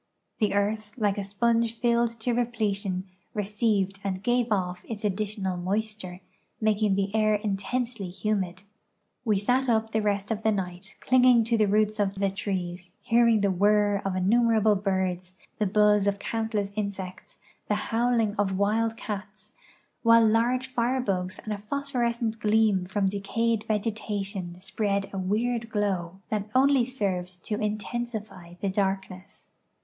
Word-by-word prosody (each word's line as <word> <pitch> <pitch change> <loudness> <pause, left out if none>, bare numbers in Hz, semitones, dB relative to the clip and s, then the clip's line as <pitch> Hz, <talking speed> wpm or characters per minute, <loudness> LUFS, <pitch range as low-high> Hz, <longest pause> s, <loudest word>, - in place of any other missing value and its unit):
The 210 -3 +1
earth, 210 +1 -1
like 205 -3 +1
a - - -2
sponge 230 +3 +1
filled 235 0 +2
to 245 +2 0
repletion, 205 -5 -1 0.3
received 205 -2 0
and 190 -1 -3
gave 245 -1 +1
off' 180 -3 -1
its 215 -2 -4
additional 200 -2 -2
moisture, 195 0 -3 0.4
making 215 -2 +2
the 195 0 -1
air 215 -1 +3
intensely 210 +1 -2
humid. 190 -1 -2 0.6
We 215 -3 +3
sat 250 +6 +1
up 220 -1 +1
the 220 - +1
rest 205 0 -1
of 220 -1 -1
the 220 - +2
night, 190 0 -4
clinging 250 -2 +5
to 230 +1 +1
the 215 -2 +3
roots 215 +1 +2
of 200 -1 +1
the 195 0 0
trees, 180 -2 -4
hearing 230 -2 +4
the 200 -1 +2
whirr 205 +1 +3
of 195 -1 -2
innumerable 220 +2 +3
birds, 185 -2 -1 0.2
the 210 - +2
buzz 210 0 +4
of 200 0 +1
countless 215 -2 -2
insects, 200 -3 -5 0.3
and - - -38
the - - -3
howl 240 +1 +2
ing 215 -2 +1
of 195 -2 0
wild 225 +3 +1
cats, 210 -1 -7 0.5
while 230 -1 +6
large 245 +4 +1
firebugs 230 -7 0
and 215 - -5
a 205 - -5
phosphorescent 235 -2 -1
gleam 210 -4 +2
from 195 +1 0
decayed 210 +3 0
vegetation 205 -4 -3
spread 200 0 -1
a 195 - -3
weird 225 +5 -1
glow 195 -4 -2
that 210 -1 -2
only 265 -1 +5
served 185 -8 -3
to 210 +1 -3
intensify 215 -4 -4
the 200 - 0
darkness. 190 -1 -3
210 Hz, 150 wpm, -27 LUFS, 195-225 Hz, 0.6 s, while